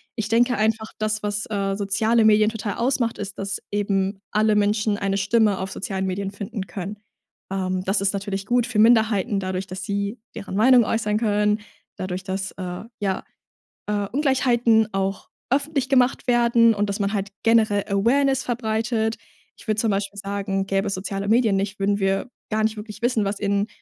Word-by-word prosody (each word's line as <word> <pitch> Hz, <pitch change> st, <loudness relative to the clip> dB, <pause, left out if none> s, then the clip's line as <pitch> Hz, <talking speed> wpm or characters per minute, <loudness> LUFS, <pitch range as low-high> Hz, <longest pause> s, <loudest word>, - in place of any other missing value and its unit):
Ich 220 Hz, -3 st, -3 dB
denke 240 Hz, +2 st, +3 dB
einfach, 220 Hz, 0 st, 0 dB
das, 215 Hz, 0 st, -1 dB
was, 205 Hz, -1 st, -2 dB
äh, 195 Hz, -2 st, -1 dB
soziale 215 Hz, +3 st, +2 dB
Medien 215 Hz, 0 st, +5 dB
total 220 Hz, -2 st, -4 dB
ausmacht, 235 Hz, -2 st, 0 dB
ist, 200 Hz, -1 st, -6 dB
dass 195 Hz, 0 st, -3 dB
eben 195 Hz, -1 st, -1 dB
alle 215 Hz, 0 st, +3 dB
Menschen 210 Hz, 0 st, +1 dB
eine 195 Hz, 0 st, -1 dB
Stimme 205 Hz, 0 st, +2 dB
auf 190 Hz, 0 st, -4 dB
sozialen 190 Hz, -1 st, -3 dB
Medien 195 Hz, +1 st, -3 dB
finden 200 Hz, 0 st, -5 dB
können. 195 Hz, +3 st, -6 dB, 0.5 s
Ähm, 185 Hz, -1 st, -1 dB
das 195 Hz, +1 st, +1 dB
ist 195 Hz, 0 st, +1 dB
natürlich 195 Hz, -1 st, -3 dB
gut 245 Hz, -1 st, +2 dB
für 225 Hz, -4 st, -1 dB
Minderheiten 220 Hz, -2 st, +4 dB
dadurch, 185 Hz, 0 st, -3 dB
dass 190 Hz, 0 st, -6 dB
sie 200 Hz, +3 st, -3 dB, 0.2 s
deren 200 Hz, -3 st, -6 dB
Meinung 245 Hz, +2 st, +6 dB
äußern 210 Hz, -2 st, 0 dB
können, 210 Hz, -1 st, +1 dB, 0.4 s
dadurch, 185 Hz, 0 st, -4 dB
dass, 190 Hz, 0 st, -3 dB
äh, 180 Hz, 0 st, -6 dB, 0.2 s
ja, 195 Hz, -2 st, -1 dB, 0.6 s
äh, 205 Hz, -1 st, -1 dB
Ungleichheiten 245 Hz, -5 st, +3 dB
auch 195 Hz, 0 st, -2 dB, 0.2 s
öffentlich 280 Hz, -1 st, 0 dB
gemacht 260 Hz, -2 st, +2 dB
werden 235 Hz, -1 st, +4 dB
und 205 Hz, 0 st, -1 dB
dass 200 Hz, +1 st, -3 dB
man 200 Hz, +1 st, 0 dB
halt 200 Hz, -1 st, -2 dB
generell 220 Hz, -3 st, +3 dB
Awareness 265 Hz, +7 st, +2 dB
verbreitet. 225 Hz, -1 st, -1 dB, 0.4 s
Ich -, -, -16 dB
würde 215 Hz, 0 st, 0 dB
zum 220 Hz, -2 st, +1 dB
Beispiel 200 Hz, 0 st, -2 dB
sagen, 195 Hz, -1 st, -2 dB
gäbe 195 Hz, +1 st, 0 dB
es 195 Hz, -, -1 dB
soziale 195 Hz, +1 st, -4 dB
Medien 225 Hz, -3 st, +3 dB
nicht, 195 Hz, +1 st, -2 dB
würden 200 Hz, +1 st, +1 dB
wir 195 Hz, +4 st, 0 dB, 0.2 s
gar 215 Hz, 0 st, 0 dB
nicht 220 Hz, 0 st, 0 dB
wirklich 210 Hz, 0 st, -8 dB
wissen, 240 Hz, -3 st, +2 dB
was 200 Hz, +1 st, -2 dB
in 200 Hz, +1 st, 0 dB
210 Hz, 180 wpm, -23 LUFS, 195-225 Hz, 0.6 s, Meinung